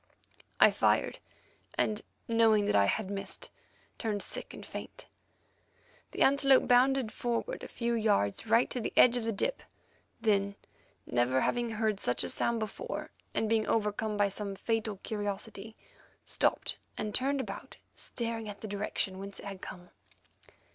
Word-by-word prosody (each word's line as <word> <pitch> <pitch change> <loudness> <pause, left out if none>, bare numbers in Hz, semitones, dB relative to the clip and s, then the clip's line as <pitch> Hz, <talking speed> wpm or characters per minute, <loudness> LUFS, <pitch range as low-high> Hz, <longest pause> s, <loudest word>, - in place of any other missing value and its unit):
I - - +8
fired, - - +2 0.6
and 215 -1 +1 0.3
knowing 225 -2 +4
that - - +1
I 100 -1 +6
had 200 - 0
missed, 195 -1 -4 0.5
turned 210 -4 -1
sick - - -4
and - - -9
faint. - - -8 1.0
The - - +1
antelope 275 -1 +5
bounded 255 -1 +4
forward 245 - -2
a - - -6
few 235 0 -2
yards 215 - +1
right 230 +3 +4
to 250 - -2
the - - -3
edge 250 -1 +7
of 240 -2 -1
the 225 - +1
dip; - - -1 0.6
then, 200 -2 +2 0.5
never 120 +2 +2
having 240 -1 +1
heard 215 -2 0
such 125 - +1
a 90 - -2
sound 235 - +2
before, 220 - -5 0.2
and 220 - +1
being 220 0 +2
overcome 210 0 0
by 205 -1 +3
some 200 0 -3
fatal 225 0 -1
curiosity, 205 0 -4 0.5
stopped - - 0 0.2
and 210 -1 -3
turned 275 +1 +1
around, - - -8 0.2
staring 230 -2 -3
at 200 - -9
the 220 - -5
direction 200 -2 -2
whence 200 0 -6
it - - -10
had 195 -2 -7
come. 180 -1 -9
215 Hz, 155 wpm, -31 LUFS, 200-235 Hz, 1.0 s, I